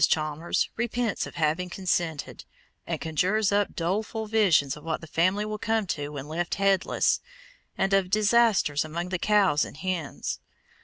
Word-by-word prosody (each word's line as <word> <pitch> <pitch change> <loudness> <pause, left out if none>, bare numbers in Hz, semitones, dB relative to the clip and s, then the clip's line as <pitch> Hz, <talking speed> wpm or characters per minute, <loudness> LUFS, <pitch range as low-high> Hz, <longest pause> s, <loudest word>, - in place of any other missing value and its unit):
Chalmers 155 +1 0
repents 235 -1 -1
of - - -12
having 165 +3 0
consented, 175 -4 -2 0.4
and - - -2
conjures 190 +7 +1
up 205 0 +1
doleful 210 +6 -2
visions 195 -11 +3
of 150 - -13
what 160 -1 -2
the - - -10
family 185 +6 +1
will 215 0 -4
come 220 0 0
to 145 -5 -3
when 145 -1 -7
left 170 +3 -2
headless, 195 -1 +2 0.6
and 195 +1 +1
of 195 -2 +3
disasters 215 -7 +3
among 170 +3 -4
the 180 -1 -2
cows 200 -8 +3
and - - -8
hens. 170 -3 -3
185 Hz, 155 wpm, -27 LUFS, 160-210 Hz, 0.6 s, visions